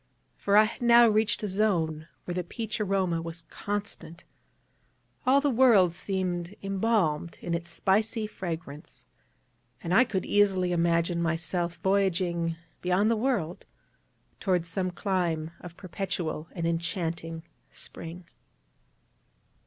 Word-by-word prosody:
For 200 +1 +2
I 215 - +9
had 220 - -4
now 235 0 +7
reached 215 0 +2
a - - 0
zone 170 -6 0 0.2
where 175 - -3
the 180 0 -2
peach 220 +4 -4
aroma 190 -4 +1
was 165 0 -7
constant; 205 -5 -5 1.0
all 270 +2 +6
the 285 0 +1
world 225 -8 +5
seemed 180 -1 -3
embalmed 195 -5 0
in 170 - -4
its 170 0 -3
spicy 215 +6 +1
fragrance; 165 -7 -7 0.8
and 170 - -1
I 225 - +7
could 200 -6 -2
easily 190 -3 +3
imagine 170 0 +1
myself 170 +1 -1
voyaging 180 -4 +1 0.3
beyond 185 +5 +2
the - - +3
world 215 -8 -1 0.8
toward 180 -4 +1
some 185 +2 -2
clime 175 -4 -1
of 175 -1 -11
perpetual 180 -4 -4
and 170 -2 -3
enchanting 165 -1 -2 0.3
Spring. 170 +2 -9
180 Hz, 120 wpm, -28 LUFS, 170-205 Hz, 1.0 s, I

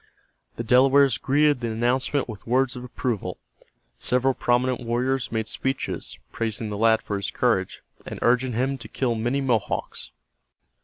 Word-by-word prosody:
The 115 - -4
Delawares 130 +1 +4
greeted 145 0 +3
the 120 -2 -3
announcement 125 +4 0
with 110 -2 -9
words 130 +2 +2
of 125 - -7
approval. 120 -3 -3 0.6
Several 130 +1 +1
prominent 125 +1 +1
warriors 125 +2 -1
made 110 -1 -2
speeches 135 +5 -3
praising 110 -1 -3
the 105 - -3
lad 110 0 +4
for 100 - -3
his 100 - -3
courage, - - 0 0.2
and - - -7
urging 125 +1 +2
him 130 +4 -1
to 115 - -9
kill 120 +1 -1
many 120 +5 -1
Mohawks. 120 -6 -2
125 Hz, 150 wpm, -24 LUFS, 115-130 Hz, 0.6 s, Delawares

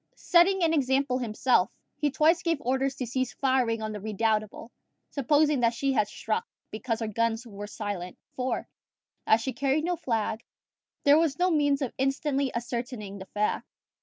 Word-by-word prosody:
Setting 360 +2 +4
an 325 -1 +3
example 265 -2 +1
himself, 230 -3 +2 0.3
he 295 - 0
twice 320 +4 +3
gave 335 -4 0
orders 265 +1 0
to 260 - -3
cease 255 +2 -2
firing 250 -5 +1
on 215 - -3
the 210 -1 -6
Redoubtable, 215 +1 -1 0.4
supposing 290 +1 +2
that 230 -1 +2
she 275 +2 0
had 215 -5 +2
struck, 455 - -3 0.2
because 225 +1 -3
her 225 - -1
guns 230 +2 -1
were 205 -2 -8
silent; 205 -4 -5 0.2
for, 255 0 -2 0.6
as 220 +1 +5
she 265 +2 -3
carried 275 +4 +1
no 355 +1 0
flag, 225 -7 -2 0.6
there 290 +2 +6
was 320 -4 +1
no 360 +1 +2
means 290 -2 +2
of 255 - -3
instantly 275 0 0
ascertaining 235 -4 -4
the 190 - -9
fact. 210 0 -1
255 Hz, 165 wpm, -28 LUFS, 225-285 Hz, 0.6 s, there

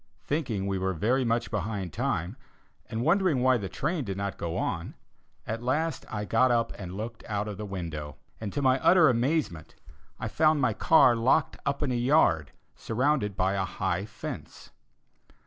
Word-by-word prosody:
Thinking 130 -10 -2
we 100 -1 -1
were 95 0 -1
very 120 +10 +1
much 115 0 0
behind 100 -4 -3
time, 85 +6 -2 0.5
and 115 0 -3
wondering 170 -5 +2
why 130 -1 +4
the 100 -2 -5
train 155 +1 -2
did 100 -4 -4
not 100 0 -3
go 85 -1 -4
on, - - -3 0.5
at 115 +1 -4
last 150 +5 -1
I 105 -1 -3
got 120 +4 +3
up 115 -1 +1
and 95 -1 -7
looked 110 +1 -6
out 105 0 -2
of 105 -2 -5
the 105 0 -5
window, 80 -6 -5 0.2
and, 105 -3 -4
to 145 - -2
my 130 0 +4
utter 170 -1 +6
amazement, 125 - -1 0.4
I - - -3
found 155 +6 +3
my 130 -5 +2
car 130 0 +5
locked 125 +7 +2
up 140 +1 0
in 140 - 0
a - - 0
yard, 120 - +3 0.2
surrounded 120 -4 0
by 95 +1 +1
a 95 -1 0
high 95 0 -2
fence. 110 - -8
115 Hz, 180 wpm, -28 LUFS, 95-135 Hz, 0.5 s, utter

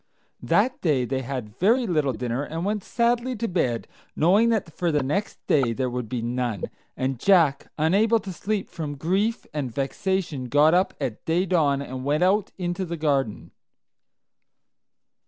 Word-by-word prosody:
That 255 0 +1
day 140 -7 +2
they 130 +2 -2
had 125 -4 -6
very 235 +7 +3
little 155 - +1
dinner, 120 +3 -2
and 165 +4 -4
went 210 -1 -1
sadly 240 +1 0
to 230 +1 -2
bed, 130 - -1 0.3
knowing 200 +9 +4
that 205 -8 -1
for 175 -2 0
the 150 -2 +1
next 195 +10 -2
day 130 -6 +2
there 130 +1 -2
would 125 -3 -4
be 120 -1 -3
none, 120 -4 -2 0.3
and 130 -1 -1
Jack, 165 -7 +3
unable 205 +9 +3
to 190 -1 -6
sleep 205 +2 -2
from 150 -4 -6
grief 195 +9 0
and 140 -5 -3
vexation, 145 - -2
got 145 +6 +4
up 185 +2 +2
at 110 - -4
day 170 +3 +1
dawn 145 -6 +2
and 130 -1 -6
went 150 +5 +1
out 200 +2 +2
into 175 0 -2
the 170 -2 -4
garden. 140 -7 -1
155 Hz, 165 wpm, -25 LUFS, 130-190 Hz, 0.3 s, knowing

